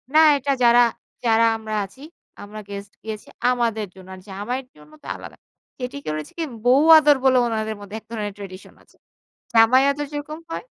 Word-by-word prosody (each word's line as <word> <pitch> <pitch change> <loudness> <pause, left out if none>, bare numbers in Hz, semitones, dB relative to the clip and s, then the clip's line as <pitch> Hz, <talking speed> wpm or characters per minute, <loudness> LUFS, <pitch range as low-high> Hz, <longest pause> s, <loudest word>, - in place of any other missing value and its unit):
না 315 - +8 0.2
এটা 280 +1 -2
যারা, 240 0 +6 0.4
যারা 230 0 +4
আমরা 220 -1 -5
আছি 230 +8 -17 0.4
আমরা 210 +1 -9
গেস্ট 200 0 -8
গেছি 215 -1 -6 0.2
আমাদের 230 -4 0
জন্য। 185 -1 -14
আর 185 - -14
জামাইয়ের 245 +7 -4
জন্য 150 0 -18
তো - - -11
আলাদা। - - -11 0.4
যেটি 250 +2 -5
করেছে 155 0 -4
কি - - 0 0.2
বৌ 255 +2 +6 0.2
আদর 295 -2 +5
বলে 260 -1 +5
ওনাদের 220 -1 -2
মধ্যে 205 +1 -9
এক 220 - -31
ধরনের 210 -3 -4
ট্র্যাডিশন 195 -1 -10
আছে। - - -27 0.6
জামাই 230 +4 +6
আদর 290 +1 -4
যেরকম 300 +2 -6
হয় 330 - -5
225 Hz, 180 wpm, -22 LUFS, 205-255 Hz, 0.6 s, না